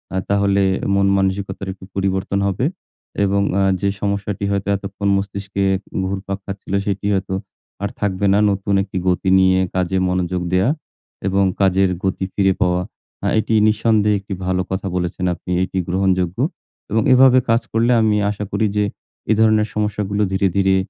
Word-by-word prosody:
আ - - +1
তাহলে 100 0 +2 0.3
মন 100 0 +3
মানসিকতার 95 0 -2
একটু 95 - -17
পরিবর্তন 95 0 -1
হবে 100 +6 -1 0.6
এবং 100 0 +2 0.2
আ - - +3 0.2
যে 100 - +2
সমস্যাটি 100 0 -2
হয়তো 100 0 -1
এতক্ষণ 100 +1 -4
মস্তিষ্কে 100 0 -3 0.4
ঘুরপাক 95 0 -4
খাচ্ছিল 100 -1 -7
সেটি 100 0 -2
হয়তো 95 -1 -1 0.5
আর 100 - 0
থাকবে 100 -1 -1
না, 100 - +4
নতুন 100 +1 -2
একটি 95 -1 -6
গতি 90 +1 +1
নিয়ে 95 0 +4 0.2
কাজে 95 0 0
মনোযোগ 90 0 -1
দেওয়া 95 +7 +3 0.6
এবং 95 +1 +2 0.2
কাজের 95 0 +3
গতি 95 0 -1
ফিরে 95 -1 +2
পাওয়া। 90 0 +2 0.4
আহ - - +1
এটি 110 +1 -1
নিঃসন্দেহে 105 -1 +2
একটি 100 0 -7
ভালো 95 0 0
কথা 95 +1 -2
বলেছেন 90 +1 -2
আপনি 90 - -8
এটি 95 - -4
গ্রহণযোগ্য 95 0 0 0.5
এবং 110 +2 +2
এভাবে 130 0 +6
কাজ 115 +1 +3
করলে 115 +2 +2
আমি 110 -1 +2
আশা 105 0 -4
করি 110 - +1
যে 105 - +3 0.5
এ - - +6
ধরনের 110 -1 +4
সমস্যাগুলো 105 -1 -1
ধীরে, 95 0 +2
ধীরে 95 -1 +3
100 Hz, 160 wpm, -19 LUFS, 95-100 Hz, 0.6 s, এভাবে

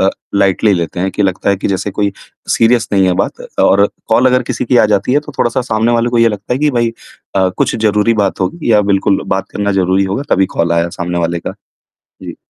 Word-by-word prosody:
अ, 95 - +3 0.3
lightly 100 +1 +2
लेते 85 +2 -4
हैं 95 +1 0
कि 105 - -2
लगता 95 0 -1
है 100 - +1
कि 100 - -3
जैसे 100 +1 -2
कोई 100 0 -1 0.4
सीरियस 115 0 +2
नहीं 95 -2 +3
है 90 - +2
बात - - -2 0.2
और 100 +1 +4 0.2
कॉल 120 +3 +3
अगर 125 0 +3
किसी 125 -1 -3
की 125 +1 +1
आ 110 - +5
जाती 100 +5 +1
है, 145 - +3
तो 150 -1 -11
थोड़ा-सा 120 +2 +1
सामने 115 -1 0
वाले 120 +1 +1
को 120 - +1
ये 115 0 +5
लगता 105 +2 -5
है 125 - 0
कि 150 0 +2
भई 120 -2 0 0.4
अ, 95 -1 +3
कुछ - - 0
ज़रूरी 105 +1 +2
बात 100 - -2
होगी 120 - -2
या 105 - +5
बिल्कुल 100 0 +1
बात 95 - -3
करना 100 -1 -1
ज़रूरी 95 0 +1
होगा 100 +9 -2
तभी 95 0 +3
कॉल 85 0 +1
आया 85 0 +1
सामने 90 0 -2
वाले 85 0 -1
का। - - -5 0.7
जी। - - -8
100 Hz, 240 wpm, -14 LUFS, 95-115 Hz, 0.7 s, आ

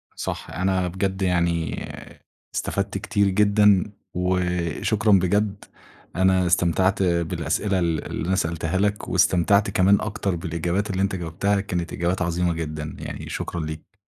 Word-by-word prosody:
صح، - - -5
أنا 95 0 0
بجد 95 +2 -2
يعني 85 -3 0 0.7
استفدْت - - -2
كتير 100 0 +1
جدًا، 100 -1 +4 0.3
وشكرًا 90 +4 0
بجد. 100 +2 +2 0.5
أنا 95 0 +3
استمتعْت 90 +3 +2
بالأسئلة 85 +2 0
ال 85 -4 -1
اللي 80 - -4
أنا 95 - +2
سألتها 85 -1 -1
لك، 105 +1 0
واستمتعْت 100 +4 +3
كمان 100 +1 +4
أكتر 100 -3 -2
بالإجابات 85 +4 -2
اللي 95 -1 -1
أنت 100 0 0
جاوبْتها 95 +4 0
كانت 90 -4 -3
إجابات 90 +2 -1
عظيمة 85 0 0
جدًا 75 -2 -5
يعني، - - -7
شكرًا 85 -3 -4
ليك. 75 0 -8
90 Hz, 130 wpm, -24 LUFS, 85-100 Hz, 0.7 s, جدًا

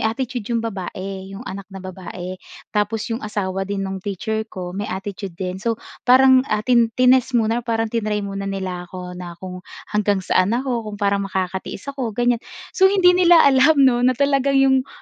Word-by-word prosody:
attitude 245 -1 -4
'yong 230 -1 -1
babae, 190 -2 -5
'yong 195 +5 -9
anak 195 -3 -7
na 195 - -11
babae. 185 0 -7 0.3
Tapos 210 +1 0
'yong 225 - -3
asawa 195 -2 -3
din 195 -1 -2
nung 190 0 -4
teacher 220 +3 -3
ko 180 -1 -6
may 205 +2 -4
attitude 195 -1 -6
din. 185 0 -4
So 230 +1 -1 0.3
parang, 260 +1 +7
ah, 215 0 -1
tin 235 -2 +4
tinest 255 0 +4
muna 225 +1 +1
or - - -19
parang 225 -1 0
tinry 210 -3 -1
muna 195 0 -4
nila 185 -2 -4
ako 180 0 -7
na 175 -1 -8
kung 180 0 -8 0.3
hanggang 205 -2 +1
saan 200 +6 +2
ako, 245 -4 -2
kung 205 - -6
parang 200 -1 +1
makakatiis 190 +1 -4
ako 240 -6 -4
ganiyan. 240 -1 +2 0.3
So 380 0 +5
hindi 375 -2 +5
nila 350 -2 +6
alam 280 +3 +5
'no 260 -3 +4
na 250 0 +3
talagang 275 0 +2
'yong, 265 -1 +3
210 Hz, 190 wpm, -21 LUFS, 190-250 Hz, 0.3 s, parang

